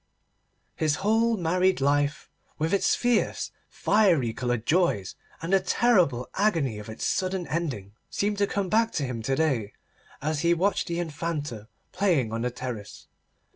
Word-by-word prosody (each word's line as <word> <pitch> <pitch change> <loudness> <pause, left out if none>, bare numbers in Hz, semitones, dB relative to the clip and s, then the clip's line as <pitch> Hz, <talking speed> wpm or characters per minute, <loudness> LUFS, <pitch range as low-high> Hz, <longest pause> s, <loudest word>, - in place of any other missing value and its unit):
His 155 -1 +1
whole 225 +1 +3
married 180 +1 +2
life, 145 +1 +1 0.3
with 160 +3 -1
its 200 - +3
fierce, 245 -2 0 0.2
fiery 175 - +2
coloured 120 -1 -2
joys 155 - +1 0.3
and 170 +3 -2
the 195 - +6
terrible 180 - +2
agony 165 - +1
of 105 - -9
its 110 - -5
sudden 185 -1 -1
ending, 135 - -3 0.2
seemed 205 0 -1
to 200 - +3
come 200 -1 -1
back 225 +4 +2
to 150 - -1
him 125 -3 -4
to 135 +4 0
day 130 -9 0 0.5
as 155 +1 -1
he 170 +2 +3
watched 190 +4 0
the 170 0 -2
Infanta 150 -8 -4 0.2
playing 155 - +1
on 115 - -2
the 125 - 0
terrace. 120 -4 -7
160 Hz, 155 wpm, -26 LUFS, 125-190 Hz, 0.5 s, the